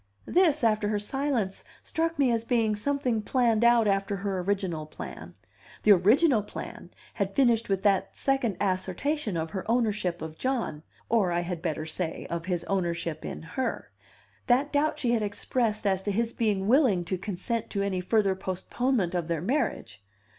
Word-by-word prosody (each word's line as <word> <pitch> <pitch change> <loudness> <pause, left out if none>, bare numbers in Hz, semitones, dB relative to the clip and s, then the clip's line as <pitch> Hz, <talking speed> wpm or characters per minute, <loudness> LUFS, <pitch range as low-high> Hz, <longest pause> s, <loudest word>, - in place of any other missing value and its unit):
This, 330 -6 +3
after 215 -2 +2
her 210 0 0
silence, 230 -3 -2 0.2
struck 330 0 -1
me 270 -4 +3
as 230 -1 0
being 230 -3 +1
something 250 0 0
planned 235 -1 +2
out 235 -2 +5
after 195 0 +1
her 195 0 -2
original 180 -5 -1
plan. - - -9 0.5
The 215 - +6
original 220 - +5
plan 205 - -8 0.2
had - - -2
finished 235 -5 +3
with 195 -1 0
that 200 -2 +1
second 260 -8 +1
assertion 195 - -1
of 160 0 -3
her 190 -2 -4
ownership 215 -8 0
of 160 0 -8
John 250 - -1 0.3
(or, 215 -6 +2
I 170 0 +1
had 175 -1 -4
better 155 -3 -2
say, 160 +1 -3
of 170 +1 -3
his 175 -2 -1
ownership 170 -4 -2
in - - -6
her), 250 +11 -3 0.6
that 270 +5 +2
doubt 295 +1 +2
she 245 -5 0
had 235 -2 +2
expressed 215 +1 -1
as 190 -2 +2
to 205 - -2
his 230 +3 0
being 205 -4 0
willing 230 - +4
to 185 - -1
consent 200 +4 -3
to 200 -1 -1
any 190 -2 -1
further 200 +1 +2
postponement 190 +2 -1
of 175 -3 -1
their 170 -2 -1
marriage. 230 - -2
205 Hz, 170 wpm, -28 LUFS, 185-240 Hz, 0.6 s, The